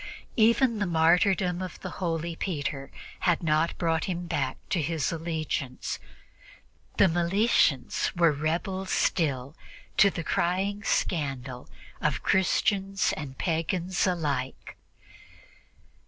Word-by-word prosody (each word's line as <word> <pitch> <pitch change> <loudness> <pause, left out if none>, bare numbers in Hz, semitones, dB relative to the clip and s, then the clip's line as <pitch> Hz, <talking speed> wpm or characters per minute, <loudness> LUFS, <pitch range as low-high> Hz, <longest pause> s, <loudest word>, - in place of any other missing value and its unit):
Even 230 0 +4
the 205 - 0
martyrdom 175 +2 +3
of 185 -1 -6
the - - -5
holy 165 -1 -1
Peter 145 -6 -3 0.3
had 175 -2 +1
not 155 +1 +1
brought 165 -1 0
him 175 -2 -3
back 135 -6 -1
to 175 - +2
his 155 -1 -1
allegiance: 155 -5 -3 1.0
the - - +6
Meletians 175 - +2
were 170 -2 +5
rebels 170 +6 -2
still, 140 -4 0 0.4
to 200 - +7
the 170 -3 -5
crying 190 +6 0
scandal 135 -10 -2 0.3
of - - 0
Christians 195 +1 +2
and 135 -4 -7
pagans 175 +3 0
alike. 145 -8 -2
170 Hz, 110 wpm, -27 LUFS, 150-185 Hz, 1.0 s, to